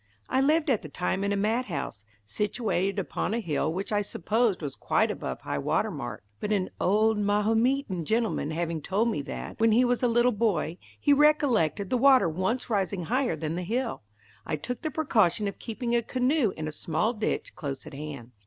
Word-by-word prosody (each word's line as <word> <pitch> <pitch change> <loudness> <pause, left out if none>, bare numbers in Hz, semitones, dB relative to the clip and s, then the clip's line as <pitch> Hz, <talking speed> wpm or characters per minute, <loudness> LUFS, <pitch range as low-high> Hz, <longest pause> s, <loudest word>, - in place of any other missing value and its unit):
I 260 - +2
lived 300 +2 +3
at 230 - +2
the 155 - -9
time 180 +5 -1
in 200 - 0
a 200 - +1
mat 220 +5 +1
house, 140 - -5 0.2
situated 200 - -1
upon 195 +2 -2
a - - 0
hill 160 -6 -1
which 190 +5 -4
I 205 -1 +2
supposed 215 +2 0
was 140 -2 -3
quite - - +1
above - - -5
high 70 - -3
water - - 0
mark, - - -6 0.2
but 210 - -3
an 195 -3 0
old 215 +3 +3
Mahometan 210 - +1
gentleman 220 -7 0
having 165 0 -2
told 205 +9 +1
me 150 - -2
that, 140 - -7
when 225 0 +4
he 240 +4 +5
was 245 0 +1
a 250 - +3
little 240 +1 +3
boy, 200 -7 0 0.2
he 290 - +4
recollected 255 - +3
the 250 - +2
water 265 -5 +6
once 190 +10 -1
rising 195 -4 -1
higher 250 - 0
than 155 0 -3
the 180 - -2
hill, 230 +6 -2 0.4
I - - -2
took 245 +12 -5
the 315 - -2
precaution 215 - +2
of 200 - -5
keeping 235 +1 -2
a 235 - +3
canoe 255 -1 +1
in 155 0 -3
a - - -3
small 165 +9 -1
ditch 215 -2 -3
close 140 -6 -5
at - - -10
hand. 140 -4 -7
210 Hz, 200 wpm, -27 LUFS, 170-240 Hz, 0.4 s, water